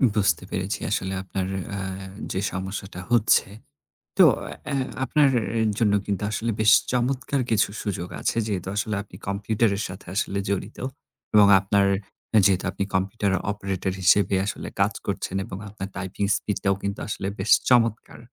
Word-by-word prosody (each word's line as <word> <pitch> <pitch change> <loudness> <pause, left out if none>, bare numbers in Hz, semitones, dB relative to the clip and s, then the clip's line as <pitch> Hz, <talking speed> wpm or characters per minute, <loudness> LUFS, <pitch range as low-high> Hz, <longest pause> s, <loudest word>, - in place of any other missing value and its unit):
বুঝতে 95 -5 +2
পেরেছি। 95 -1 -2
আসলে 95 -2 -1
আপনার 95 0 -3 0.3
আ - - -3 0.5
যে 95 - -1
সমস্যাটা 95 0 -5
হচ্ছে। 115 -4 +4 0.7
তো - - +9 0.3
এ - - -7
অ্যা 150 - -2 0.3
আপনার 145 +2 +4 0.3
এ - - +2 0.2
জন্য 105 -3 +3
কিন্তু 100 -1 -2
আসলে 110 +3 -1
বেশ 110 -1 +6 0.2
চমৎকার 130 +2 0
কিছু 110 -3 +3
সুযোগ 90 -4 -3
আছে। - - -1
যেহেতু 95 -4 -3
আসলে 105 +1 -1
আপনি 100 - -14
কম্পিউটারের 100 +1 0
সাথে 90 +1 -10
আসলে 100 -1 -1
জড়িত 100 +2 -3 0.6
এবং 105 -1 +8
আপনার 100 +1 +2 0.6
যেহেতু 95 -2 +2
আপনি - - -2
কম্পিউটার 95 +1 0 0.2
অপারেটর 95 -2 -2
হিসেবে 95 +1 +4
আসলে - - -4
কাজ - - +3
করছেন 95 - -2
এবং 95 - -7
আপনার 100 -1 -6
টাইপিং 95 +1 -3
স্পিডটাও 100 -1 0
কিন্তু 100 +1 -3
আসলে 100 -2 -3
বেশ 95 +4 -2 0.2
চমৎকার! 115 -3 +2
100 Hz, 150 wpm, -25 LUFS, 95-110 Hz, 0.7 s, তো